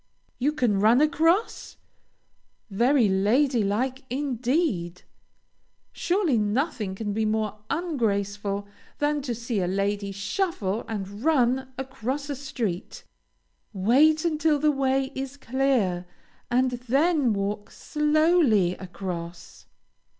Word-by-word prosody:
You 280 +4 +2
can 245 -10 +1
run 220 +5 +5
across? 330 +7 +1 0.9
Very 240 +4 +3
lady 225 +6 +2
like 250 +7 -1
indeed! 250 - -1 0.9
Surely 350 - +1
nothing 210 - -1
can 205 0 -3
be 220 +2 0
more 215 -1 -1
ungraceful 205 - -1 0.3
than 295 0 0
to 250 -4 -3
see 230 -1 -3
a 180 - 0
lady 200 +1 -1
shuffle 205 - -2
and 205 0 -6
run 260 -4 +2
across 265 +2 -4
a - - -2
street. 240 -9 -4 0.7
Wait 285 - +3
until 310 -2 +2
the 300 +1 +3
way 270 -1 0
is 270 +1 -5
clear 240 -10 0 0.4
and 250 +1 +2
then 265 +3 +1
walk 205 +1 -3
slowly 300 - +2
across. 180 -2 -7
245 Hz, 105 wpm, -25 LUFS, 205-285 Hz, 0.9 s, run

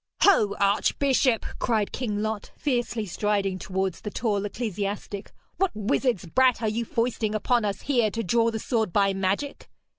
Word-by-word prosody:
'Ho, 215 - +5
archbishop!' 235 +5 +2
cried 220 -4 +1
King 210 -5 -2
Lot, 215 -1 -3
fiercely 240 -5 -1
striding 195 0 -1
towards 190 -1 -2
the 210 - -4
tall 205 -2 -1
ecclesiastic, 205 -2 -4 0.3
'what 385 0 +2
wizard's 215 -1 0
brat 255 +7 +3
are 225 - -1
you 230 +2 -2
foisting 230 -2 -1
upon 235 +2 +2
us 200 -2 -2
here 240 -6 +2
to 230 +2 -3
draw 230 +5 +2
the 225 - -3
sword 220 -3 -1
by 195 +1 +3
magic?' 195 +9 -2
215 Hz, 155 wpm, -26 LUFS, 200-240 Hz, 0.3 s, Ho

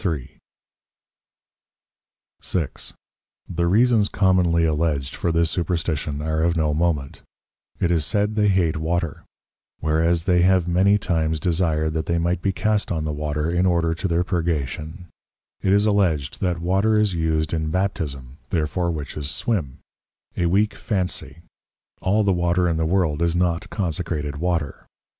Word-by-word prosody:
6. 80 -7 -3 0.5
The 85 -1 -1
Reasons 110 +2 +3
commonly 90 -4 +3
alledged 75 -4 0
for 85 - -1
this 80 0 +2
Superstition 80 -4 -2
are 80 0 0
of 85 +1 +1
no 75 -2 +1
moment: 75 -4 -1 0.6
It 85 - +1
is 80 -3 +2
said 105 +5 0
they 105 -1 +2
hate 95 -5 +3
the - - -4
Water; 80 -1 -2 0.6
whereas 80 +2 +1
they 90 0 +3
have 90 -1 +3
many 95 +4 +4
times 80 -5 0
desired 80 -2 0
that 80 -1 -2
they 85 - +1
might 85 +1 0
be 100 - +1
cast 105 +2 0
on 80 -3 -1
the 75 - -1
Water 75 +1 -2
in 90 +2 +2
order 85 -2 +2
to 80 +4 -3
their 85 0 +1
purgation: 80 -1 -3 0.6
It 95 - +1
is 100 +1 +4
alledged, 85 -9 +1
that 90 -3 0
Water 95 +6 +2
is 105 -3 +2
used 80 -2 0
in 80 -1 -1
Baptism, 75 -7 -3
therefore 85 +2 0
Witches 75 -2 -4
swim: 80 - -1 0.6
A 85 - +1
weak 100 +5 +2
Phansie; 90 - -3 0.6
all 105 +4 +2
the 100 -2 +2
Water 85 0 +1
in 85 -2 0
the 80 0 0
World 85 -4 +1
is 85 0 +2
not 90 +3 0
consecrated 80 -6 -2
Water. 80 -3 -2
85 Hz, 150 wpm, -23 LUFS, 80-95 Hz, 0.6 s, many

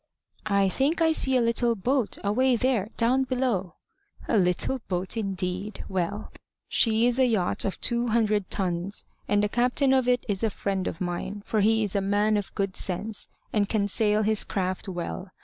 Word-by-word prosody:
"I 200 -1 +3
think 275 - 0
I 325 -1 +4
see 265 -4 +3
a - - +3
little 235 0 +1
boat, 245 +3 0
away 245 +5 +2
there, 235 -4 0
down 255 +3 +3
below." 245 -10 -1 0.5
"A - - +1
little 185 +7 +1
boat, 185 +2 -2
indeed! 195 -1 -3
Well! 190 +3 -3 0.4
She's 235 +2 +2
a 260 - +5
yacht 210 -7 0
of 195 - -3
two 240 0 +2
hundred 215 -3 +1
tons; 185 0 -2 0.2
and 205 0 +2
the - - +3
captain 250 +5 +2
of 260 -2 +2
it 250 -1 +2
is 205 -1 -1
a 225 - +3
friend 195 -2 -2
of 165 - -5
mine; 185 +3 -4
for 215 - 0
he 220 +2 +3
is 205 -2 -3
a 200 - +2
man 205 +2 +2
of 205 -2 -3
good 195 -1 -1
sense, 205 +3 -4 0.2
and 205 -2 +1
can 205 -2 +1
sail 210 +1 +1
his 215 0 +2
craft 185 +1 -3
well. 180 +1 -5
210 Hz, 185 wpm, -26 LUFS, 195-240 Hz, 0.5 s, a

